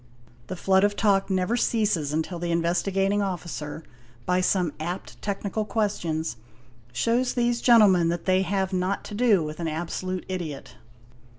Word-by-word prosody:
The 185 - -5
flood 190 +2 +3
of 205 0 +2
talk 200 -2 +2
never 185 +4 +1
ceases 210 -11 +1
until 160 +3 -2
the 175 0 -3
Investigating 195 +4 +1
Officer, 170 -5 -4 0.4
by 180 0 +2
some 180 -4 +1
apt 175 +4 -6
technical 200 +1 -2
questions, 170 - -2 0.5
shows 235 - 0
these 240 -1 +1
gentle 230 -4 +7
_ - - +5
men 175 -2 +2
that 170 0 -3
they 185 0 +3
have 190 +1 -1
not 185 +2 -1
to 210 - -9
do 210 -5 +3
with 155 +1 -6
an 170 - -2
absolute 175 +3 -4
idiot. 170 -7 -5
185 Hz, 160 wpm, -25 LUFS, 170-205 Hz, 0.5 s, gentle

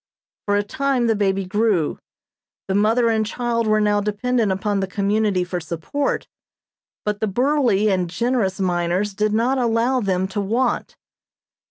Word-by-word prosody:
For 205 - +2
a 205 - +2
time 265 +3 0
the 225 -1 +2
baby 195 -2 0
grew. 205 -4 0 0.7
The 190 - -1
mother 225 +4 +3
and 220 -1 +2
child 230 +1 -1
were 215 0 +3
now 210 -1 +2
dependent 215 +1 0
upon 200 +1 -1
the 190 - -1
community 200 -1 0
for 180 0 -3
support, 170 - -3 0.8
but 210 -1 -1
the 220 - 0
burly 240 -2 +2
and 180 -2 0
generous 225 -1 0
miners 180 +2 0
did 210 +1 0
not 240 +5 +1
allow 240 +2 +1
them 190 -4 0
to 205 +2 -2
want. 235 +5 -1
210 Hz, 155 wpm, -21 LUFS, 195-235 Hz, 0.8 s, mother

